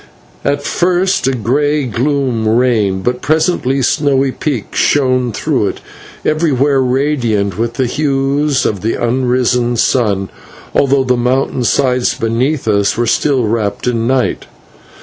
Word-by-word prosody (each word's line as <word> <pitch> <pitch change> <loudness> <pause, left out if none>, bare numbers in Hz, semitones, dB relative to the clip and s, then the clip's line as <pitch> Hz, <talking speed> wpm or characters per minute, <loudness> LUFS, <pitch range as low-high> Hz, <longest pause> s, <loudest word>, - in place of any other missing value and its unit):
At 145 0 -1
first 180 0 +1
a 135 - +1
grey 145 +5 0
gloom 125 -1 -1
reigned, 110 -5 +1
but 125 0 -1
presently 145 -3 0
snowy 135 -1 +1
peaks 130 -6 -3
shone 130 -3 +2
through - - -1
it, - - -5 0.4
everywhere 145 -3 +1
radiant 125 -7 0
with 115 0 -1
the 130 - 0
hues 140 +1 0
of 100 -4 -1
the 110 - -1
unrisen 125 0 0
sun, 100 -6 0 0.4
although 140 -1 +2
the 125 -1 +1
mountain 125 +1 0
sides 125 +1 +1
beneath 125 +5 -1
us 100 0 +1
were 120 - +1
still 135 +2 +1
wrapped 105 -2 -2
in 115 -2 0
night. 130 0 0
130 Hz, 130 wpm, -14 LUFS, 115-140 Hz, 0.4 s, shone